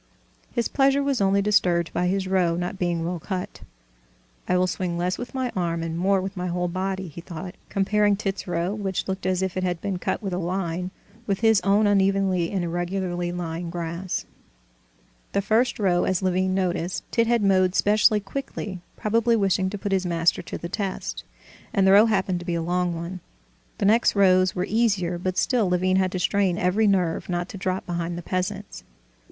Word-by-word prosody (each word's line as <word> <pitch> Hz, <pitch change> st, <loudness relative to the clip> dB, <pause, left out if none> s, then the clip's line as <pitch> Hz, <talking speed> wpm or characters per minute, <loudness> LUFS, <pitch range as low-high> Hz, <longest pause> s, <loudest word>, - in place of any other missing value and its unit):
His 235 Hz, -2 st, 0 dB
pleasure 275 Hz, 0 st, +2 dB
was 275 Hz, -5 st, 0 dB
only 195 Hz, 0 st, +3 dB
disturbed 175 Hz, -5 st, +2 dB
by 180 Hz, -, +1 dB
his 190 Hz, +1 st, 0 dB
row 180 Hz, -3 st, +2 dB
not 180 Hz, +2 st, -4 dB
being 170 Hz, -2 st, 0 dB
well 175 Hz, 0 st, -3 dB
cut. 185 Hz, +2 st, -5 dB, 0.9 s
"I 180 Hz, -, +2 dB
will 180 Hz, -, +3 dB
swing 180 Hz, -1 st, -2 dB
less 180 Hz, +2 st, -1 dB
with 245 Hz, +2 st, -7 dB
my 260 Hz, -2 st, -1 dB
arm 170 Hz, -2 st, -1 dB
and 165 Hz, 0 st, -3 dB
more 190 Hz, +3 st, +2 dB
with 190 Hz, +1 st, -5 dB
my 180 Hz, -1 st, -3 dB
whole 180 Hz, 0 st, -1 dB
body," 190 Hz, +1 st, -3 dB
he 165 Hz, +2 st, -9 dB
thought, 180 Hz, +1 st, -7 dB, 0.2 s
comparing 205 Hz, +1 st, +2 dB
Tit's 195 Hz, -1 st, -4 dB
row, 175 Hz, +2 st, -1 dB
which 195 Hz, -3 st, -3 dB
looked 190 Hz, -1 st, -3 dB
as 185 Hz, 0 st, +1 dB
if 190 Hz, -1 st, -2 dB
it 185 Hz, -, -1 dB
had 175 Hz, -2 st, -1 dB
been 190 Hz, -1 st, -3 dB
cut -, -, -1 dB
with 195 Hz, -2 st, -3 dB
a 180 Hz, -, -1 dB
line, 180 Hz, 0 st, -2 dB, 0.4 s
with 195 Hz, -1 st, -1 dB
his 220 Hz, -3 st, +4 dB
own 200 Hz, +3 st, +3 dB
unevenly 195 Hz, -3 st, +2 dB
and 190 Hz, -3 st, -1 dB
irregularly 175 Hz, 0 st, -2 dB
lying 170 Hz, -1 st, -4 dB
grass. 170 Hz, +1 st, -4 dB, 1.1 s
The 200 Hz, -, +2 dB
first 230 Hz, +5 st, +2 dB
row, 180 Hz, -4 st, +2 dB
as 185 Hz, 0 st, 0 dB
Levin 185 Hz, 0 st, +1 dB
noticed, 180 Hz, -2 st, -1 dB
Tit 230 Hz, -1 st, +2 dB
had 235 Hz, -2 st, +2 dB
mowed 185 Hz, -2 st, +3 dB
specially 210 Hz, +1 st, +4 dB
quickly, 200 Hz, -3 st, -6 dB, 0.2 s
probably 230 Hz, +2 st, +2 dB
wishing 195 Hz, -3 st, +1 dB
to 205 Hz, -, -5 dB
put 200 Hz, 0 st, -4 dB
his 190 Hz, -1 st, +1 dB
master 170 Hz, -1 st, +2 dB
to -, -, -6 dB
the 170 Hz, -, -6 dB
test, 195 Hz, +1 st, -4 dB, 0.5 s
and 195 Hz, -, +4 dB
the 190 Hz, -, +6 dB
row 205 Hz, +3 st, +7 dB
happened 190 Hz, -4 st, 0 dB
to 175 Hz, -, -9 dB
be 175 Hz, -, 0 dB
a 165 Hz, -, -1 dB
long 175 Hz, 0 st, 0 dB
one. 170 Hz, +3 st, -5 dB, 0.6 s
The 200 Hz, -, -1 dB
next 220 Hz, +3 st, +4 dB
rows 185 Hz, -2 st, +4 dB
were 180 Hz, -, 0 dB
easier, 200 Hz, -6 st, +1 dB
but 185 Hz, +1 st, -2 dB
still 235 Hz, -7 st, +2 dB
Levin 185 Hz, +1 st, +2 dB
had 185 Hz, -1 st, +1 dB
to -, -, -1 dB
strain 185 Hz, 0 st, +1 dB
every 195 Hz, +5 st, +2 dB
nerve 180 Hz, -5 st, +1 dB
not 175 Hz, 0 st, -1 dB
to -, -, -7 dB
drop 185 Hz, 0 st, -2 dB
behind 175 Hz, -1 st, -3 dB
the 175 Hz, -, -6 dB
peasants. 195 Hz, +3 st, -3 dB
185 Hz, 200 wpm, -24 LUFS, 175-200 Hz, 1.1 s, row